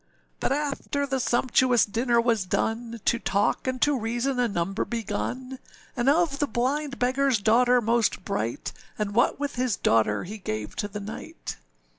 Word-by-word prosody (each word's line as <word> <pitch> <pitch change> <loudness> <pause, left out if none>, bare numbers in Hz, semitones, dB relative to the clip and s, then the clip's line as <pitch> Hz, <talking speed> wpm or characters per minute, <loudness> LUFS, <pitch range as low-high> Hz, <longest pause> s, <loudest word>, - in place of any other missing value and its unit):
But - - 0
after 285 0 -1
the 270 -1 -1
sumptuous 245 0 +3
dinner 235 +3 +1
was 230 -5 +1
done, 230 +4 -1
To 235 - +2
talk 200 +6 0
and 255 0 -1
to 290 -1 +3
reason 240 +3 -1
a 245 - +3
number 195 -1 -1
begun, 245 +3 -4 0.4
And 245 +1 +2
of 300 -2 +2
the 290 - +1
blind 275 +4 -1
beggarâs 260 -1 +2
daughter 245 +3 +4
most 230 -4 +1
bright; 110 +3 -3 0.2
And 210 -1 -2
what 240 +4 +2
with 285 -3 -3
his 250 -4 +1
daughter 110 -8 +2
he 210 +4 -7
gave 110 - -4
to 205 - -1
the 210 0 -6
knight. 200 - -7
240 Hz, 165 wpm, -26 LUFS, 210-260 Hz, 0.4 s, daughter